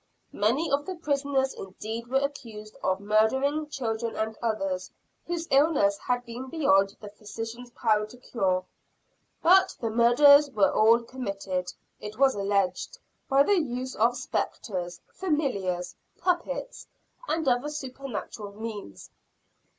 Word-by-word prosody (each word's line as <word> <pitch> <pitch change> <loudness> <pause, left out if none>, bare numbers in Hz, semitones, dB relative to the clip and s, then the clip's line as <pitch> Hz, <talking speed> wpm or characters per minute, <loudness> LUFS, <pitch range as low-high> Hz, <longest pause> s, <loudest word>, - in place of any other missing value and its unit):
Many 265 +10 +1
of 285 +1 +1
the 375 - -3
prisoners 280 -4 0
indeed 220 +5 -7
were 265 +2 +2
accused 225 -7 -6
of 190 0 +1
murdering 265 +9 +1
children 230 -4 -3
and 220 0 -2
others, 275 +5 -2 0.4
whose 335 -1 -3
illness 270 -9 +4
had 245 0 -1
been 245 +2 -7
beyond 200 -11 +3
the 210 - -9
physician's 225 +4 -8
power 215 -3 +1
to 245 - -14
cure; 190 -7 -1 0.8
but 375 +3 +5
the 225 -2 -2
murders 285 +6 +6
were 210 -7 +3
all 230 +2 +5
committed, 195 -7 -4 0.3
it 210 0 -8
was 270 0 +5
alleged, 200 -2 -1 0.3
by 275 +1 +5
the 390 +2 +3
use 255 -2 -4
of 235 +3 +2
"spectres," 180 -7 -3
"familiars," 250 - -1 0.2
"puppets," - - -2 0.4
and 320 -2 -1
other 250 +3 +2
supernatural 255 -7 -6
means. 215 - -7
240 Hz, 125 wpm, -27 LUFS, 210-280 Hz, 0.8 s, murders